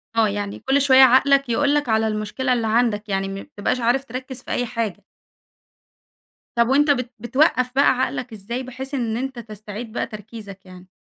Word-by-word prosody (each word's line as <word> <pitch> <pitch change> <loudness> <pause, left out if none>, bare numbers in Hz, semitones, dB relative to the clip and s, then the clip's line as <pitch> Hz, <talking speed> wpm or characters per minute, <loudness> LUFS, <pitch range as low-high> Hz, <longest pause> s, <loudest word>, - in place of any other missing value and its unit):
آه 225 -1 +4
يعني 200 0 -4
كل 270 +2 +1
شوية 265 -1 +6
عقلك 275 +1 +4
يقول 285 +5 +2
لك 290 -5 0
على 220 0 +2
المشكلة 215 +5 -1
اللي 230 -2 -1
عندك 220 -2 +1
يعني 195 0 -1
م 195 - -5
ما 195 - -6
بتبقاش 205 +5 -3
عارف 245 +3 +1
تركز 255 +1 -7
في - - -8
أي 245 - 0
حاجة. 220 -4 -4 1.5
طَب 235 0 +3
وأنت 290 +2 +4
بت 250 -3 -1
بتوقَف 255 +1 +2
بقى 280 - +5
عقلك 250 -2 -3
إزاي، 235 +5 -5
بحيث 265 +2 -8
إن 235 -4 -1
أنت 265 -1 -4
تستعيد 215 0 -8
بقى 235 - -3
تركيزك 210 -3 -10
يعني؟ 185 0 -14
235 Hz, 185 wpm, -22 LUFS, 215-260 Hz, 1.5 s, شوية